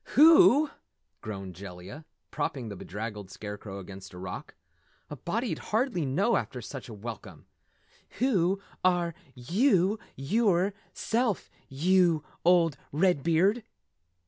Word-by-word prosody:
"Wheww!" 305 -1 +7 0.5
groaned 95 -4 -6
Jellia, 95 - -10 0.3
propping 135 -5 -3
the 100 - -6
bedraggled 105 +1 -6
Scarecrow 105 0 -7
against 95 0 -10
a - - -9
rock. 90 0 -7 0.6
"A - - -4
body'd 220 - -2
hardly 220 - 0
know, 195 - +2
after 125 - -4
such 125 +2 -8
a - - -7
welcome. 110 +1 -8 0.7
Whew 195 -6 +2 0.2
are 175 -2 +2 0.2
yew, 190 - +2 0.2
yewerself, 200 - 0 0.2
yew 170 +2 +3 0.2
old 170 -4 +4
Redbeard!" 175 - +2
165 Hz, 105 wpm, -28 LUFS, -, 0.7 s, Wheww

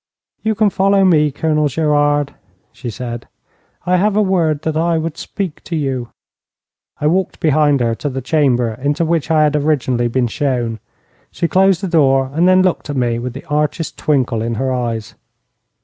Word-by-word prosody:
'You 220 0 0
can 210 -1 +2
follow 195 +1 +3
me, 155 -5 +4
Colonel 150 +1 0
Gerard,' 145 -1 +1 0.4
she 120 - -7
said. 120 +1 -6 0.6
'I 180 0 +2
have 205 +2 +1
a - - +4
word 165 -6 0
that 160 -1 -2
I 165 +1 +1
would 160 -1 -3
speak 185 -3 -5
to 170 - -4
you.' 135 -5 -2 0.9
I - - -3
walked 180 +4 0
behind 150 -3 +2
her 115 -1 +1
to 145 +6 -4
the 130 0 -4
chamber 125 -5 +1
into 145 +4 0
which 165 -2 -1
I 155 -1 +4
had 150 0 +2
originally 135 -5 +1
been 125 +1 0
shown. 120 -4 -2 0.5
She 170 - -2
closed 190 0 +3
the 195 - -2
door, 135 -6 +2
and 170 +4 +2
then 185 0 +5
looked 180 -4 -1
at 145 - -3
me 120 -2 0
with 125 0 -5
the 135 - -9
archest 150 +2 -2
twinkle 130 -6 0
in 115 +1 -2
her 130 +3 -1
eyes. 115 -4 -3
150 Hz, 180 wpm, -17 LUFS, 130-165 Hz, 0.9 s, then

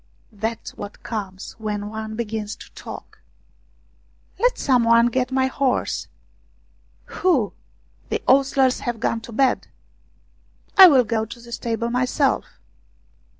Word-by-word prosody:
That's 220 +2 -4
what 205 0 -9
comes 195 -4 -5
when 210 -1 -3
one 220 0 -5
begins 220 -2 -4
to - - -14
talk. - - -10 0.6
" - - -36
Let - - +2
some 255 -4 +3
one 230 0 +5
get 255 0 0
my 260 0 +2
horse! 265 0 -1 0.3
" - - -38
" - - -37 0.2
Who? 290 - +2 0.6
The - - -2
ostlers 265 -1 +4
have 240 -2 -3
gone 230 0 -1
to 230 - -10
bed." 260 +3 +1 0.6
" - - -38 0.3
I 380 -1 +11
will 270 -7 +6
go 220 -1 -1
to 235 +2 -10
the 235 0 -13
stables 235 0 -2
myself." 255 +3 +1
235 Hz, 145 wpm, -22 LUFS, 220-260 Hz, 0.6 s, I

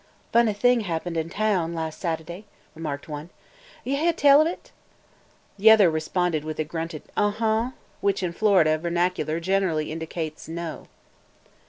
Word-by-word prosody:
"Funny 235 -2 +4
thing 245 +4 +3
happened 175 -4 -3
in 160 0 -2
taown 185 -5 0
las' 160 -1 -3
Sat'day," 170 +3 -5 0.3
remarked 150 -3 -5
one. 150 +1 -7 0.5
"Yuh 275 +2 -1
heah 330 +4 +2
tell 285 -2 +6
of 310 - +3
it?" 345 - -7 0.9
The 220 +3 +7
other 210 -6 +7
responded 160 0 -1
with 155 0 -5
a 155 - 0
grunted 165 0 -5
"Uh 205 0 +2
uh!" 225 +2 +1 0.3
which 200 -1 0
in 175 -2 -2
Florida 170 -6 +3
vernacular 170 -1 -1
generally 175 -4 0
indicates 160 -1 -5
"No!" 165 0 -6
170 Hz, 150 wpm, -25 LUFS, 160-210 Hz, 0.9 s, The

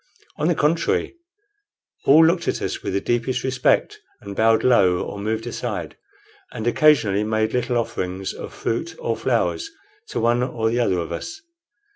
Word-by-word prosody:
On 150 - 0
the 175 - +2
contrary, 165 - +1 0.9
all 155 +4 +7
looked 170 +2 +1
at - - 0
us - - -3
with - - -4
the 100 - +1
deepest 120 +1 -1
respect, 130 -1 +1 0.2
and 100 0 -8
bowed 110 +1 +3
low 95 -8 +4
or 100 - -7
moved 110 +2 -2
aside, - - -4 0.6
and 110 - -6
occasionally 120 -7 +3
made 110 0 0
little 125 0 0
offerings 95 -4 -3
of - - -8
fruit 115 - -3
or - - -2
flowers 325 - -1 0.4
to - - -3
one 120 +1 +2
or 115 -3 -1
the 120 - 0
other 100 -7 +1
of 85 -2 -4
us. 320 -1 -6
120 Hz, 165 wpm, -22 LUFS, 110-135 Hz, 0.9 s, all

